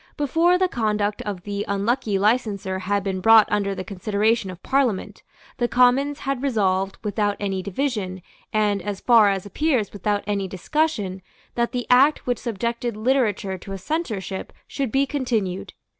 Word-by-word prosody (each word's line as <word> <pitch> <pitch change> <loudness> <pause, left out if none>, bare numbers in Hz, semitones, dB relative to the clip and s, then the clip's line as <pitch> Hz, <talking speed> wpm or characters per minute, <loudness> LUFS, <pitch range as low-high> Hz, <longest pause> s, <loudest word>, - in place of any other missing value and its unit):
Before 330 +5 +3
the 370 0 +2
conduct 210 - -1
of 190 -4 -4
the 205 0 -3
unlucky 205 +2 0
licenser 200 -3 0
had 200 +1 -1
been 190 -1 -2
brought 225 +1 +7
under 200 -1 0
the 185 - -5
consideration 205 +2 0
of 185 -1 -10
Parliament, 265 -8 0 0.4
the 240 - +1
Commons 250 +5 +3
had 275 -2 -2
resolved, 195 -7 0
without 205 -1 0
any 195 -2 -2
division, 200 -3 -3 0.3
and, 210 -2 +1
as 205 0 -4
far 230 -4 +5
as 195 -1 -2
appears, 255 0 0
without 205 +1 -1
any 200 -2 -1
discussion, 195 - -1 0.3
that 235 -1 0
the 245 -1 -3
Act 275 +5 +5
which 245 -2 -1
subjected 235 0 -3
literature 215 -6 0
to 195 - -8
a - - -4
censorship 205 - -4 0.2
should 270 -5 -3
be 270 +3 +3
continued. 230 -10 -2
210 Hz, 160 wpm, -23 LUFS, 195-250 Hz, 0.4 s, brought